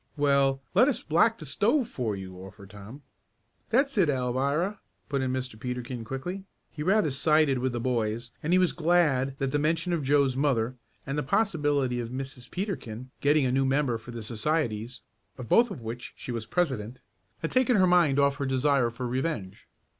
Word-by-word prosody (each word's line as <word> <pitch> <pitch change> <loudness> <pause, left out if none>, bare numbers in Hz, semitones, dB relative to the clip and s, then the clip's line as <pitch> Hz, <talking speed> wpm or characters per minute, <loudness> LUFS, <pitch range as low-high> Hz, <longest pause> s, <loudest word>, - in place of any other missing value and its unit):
"Well, 140 -2 +2
let 255 - +5
us 280 - -1
black 220 +9 +3
the 155 - -9
stove 225 - +1
for 115 - -3
you," 95 -1 -8
offered 95 +1 -12
Tom. 105 +8 -11 0.7
"That's 275 +4 +2
it, 170 -5 +4
Alvirah," 140 +9 0 0.3
put 140 -2 0
in 130 -1 -1
Mr. 130 -4 -4
Peterkin 125 0 -5
quickly. 175 - -5 0.3
He 150 - -7
rather 185 -1 +2
sided 150 -1 +3
with 130 +1 0
the 120 - -3
boys, 115 -1 -1
and 155 - -2
he 180 - +5
was 180 -1 +3
glad 150 -6 +2
that 135 -2 -1
the 145 - +1
mention 165 +4 0
of 165 - 0
Joe's 140 -1 +2
mother, 130 -4 +1 0.3
and 140 +2 -2
the - - +1
possibility 145 - +1
of 115 -1 -4
Mrs. 130 -1 -7
Peterkin 130 - -5
getting 145 0 +3
a 125 - +1
new 135 +1 +2
member 135 -3 +1
for 110 - -14
the 115 -2 -6
societies, 115 0 -2 0.4
of 125 -3 -7
both 235 - +5
of 160 - -8
which 115 +2 -6
she - - -6
was 115 -2 -4
president, 130 -8 -1 0.4
had 165 - -2
taken 255 -1 +3
her 190 -2 +5
mind 175 -6 +4
off 140 0 +3
her 140 -2 -2
desire 135 -1 +2
for 125 +2 -5
revenge. 120 - -3
135 Hz, 190 wpm, -27 LUFS, 125-160 Hz, 0.7 s, let